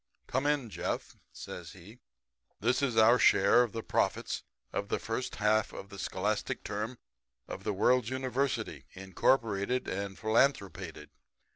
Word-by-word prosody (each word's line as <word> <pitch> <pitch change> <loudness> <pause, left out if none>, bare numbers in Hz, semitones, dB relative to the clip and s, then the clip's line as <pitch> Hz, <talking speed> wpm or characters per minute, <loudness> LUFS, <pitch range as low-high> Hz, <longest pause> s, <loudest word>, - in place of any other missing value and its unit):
Come 130 +3 0
in, 140 -6 0
Jeff,' 85 0 -3 0.2
says 85 -1 -8
he. 100 +6 -14 0.6
'This 125 +5 +2
is 125 -5 0
our 115 +3 +6
share - - +6
of 120 -3 0
the 115 +1 -5
profits - - 0 0.3
of 100 +1 -2
the - - +1
first 115 +3 -3
half 105 0 +2
of 100 - -8
the 100 -1 -10
scholastic - - -2
term 110 +4 -4 0.5
of - - -7
the - - 0
World's 120 +4 +3
University, 130 0 -2
incorporated 100 +4 +1
and 100 0 -4
philanthropated. 100 - 0
110 Hz, 140 wpm, -31 LUFS, 100-125 Hz, 0.6 s, our